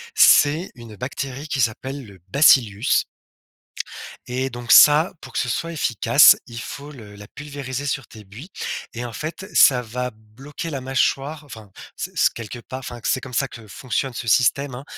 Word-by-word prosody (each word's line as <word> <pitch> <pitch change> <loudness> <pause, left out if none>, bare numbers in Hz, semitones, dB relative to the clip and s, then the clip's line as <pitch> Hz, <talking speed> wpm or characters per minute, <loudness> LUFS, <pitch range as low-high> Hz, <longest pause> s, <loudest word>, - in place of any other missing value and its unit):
C'est 155 +6 +5
une 115 -3 -12
bactérie 135 +5 -6
qui 135 -3 -1
s'appelle 130 +4 -3
le 100 -3 -15
Bacillus 120 -4 +4 1.2
et 130 +2 -2
donc 120 0 -5
ça, 150 +4 +7
pour - - -12
que - - -1
ce 125 - -1
soit 165 +8 -3
efficace, 140 0 +5
il 115 -1 -8
faut 145 +5 -8
le 110 -7 -13
la 100 0 -12
pulvériser 140 -1 -7
sur 135 -2 -2
tes 110 -1 -14
buis 115 - -12 0.4
et 120 +1 -5
en 120 - -7
fait, 160 - -6
ça 125 -3 +6
va 125 +2 -5
bloquer 130 +10 -9
la 135 -4 -5
mâchoire, 140 +3 -1
enfin 110 -7 -12 0.2
c - - -6 0.2
quelque 115 +1 -7
part, 130 +2 -8
enfin, 125 -2 -8
c'est 130 - 0
comme 130 -2 -10
ça 135 +1 0
que 115 -3 -13
fonctionne 125 +4 -3
ce 115 - -6
système, 125 +5 +2
hein, 130 - -8
130 Hz, 175 wpm, -21 LUFS, 115-140 Hz, 1.2 s, ça